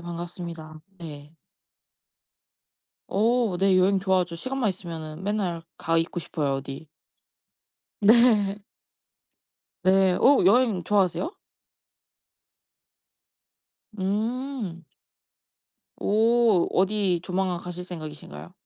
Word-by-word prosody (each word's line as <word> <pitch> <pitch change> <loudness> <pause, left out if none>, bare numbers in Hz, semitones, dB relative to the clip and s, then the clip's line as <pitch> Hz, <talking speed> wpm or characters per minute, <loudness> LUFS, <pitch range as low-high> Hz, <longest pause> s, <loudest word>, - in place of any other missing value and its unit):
반갑습니다. 170 -2 -7 0.2
네. 150 -2 -10 1.8
오 225 -1 +1
네. 190 0 +4
여행 190 +1 +3
좋아하죠. 185 -3 0
시간만 255 +5 -2
있으면은 165 -3 -6
맨날 195 -5 -2 0.2
가 165 0 0
있고 165 +2 -1
싶어요 145 -4 -2
어디. 135 +3 -8 1.1
네. 210 -2 +5 1.3
네. 190 -1 +4
오 275 -6 +5
여행 210 -1 +3
좋아하세요? 205 - +1 2.7
음. 215 -1 -3 1.1
오 225 -2 +3
어디 190 -2 +1
조만간 185 -1 -1
가실 180 +1 -7
생각이신가요? 150 - -9
185 Hz, 180 characters per minute, -25 LUFS, 170-210 Hz, 2.7 s, 네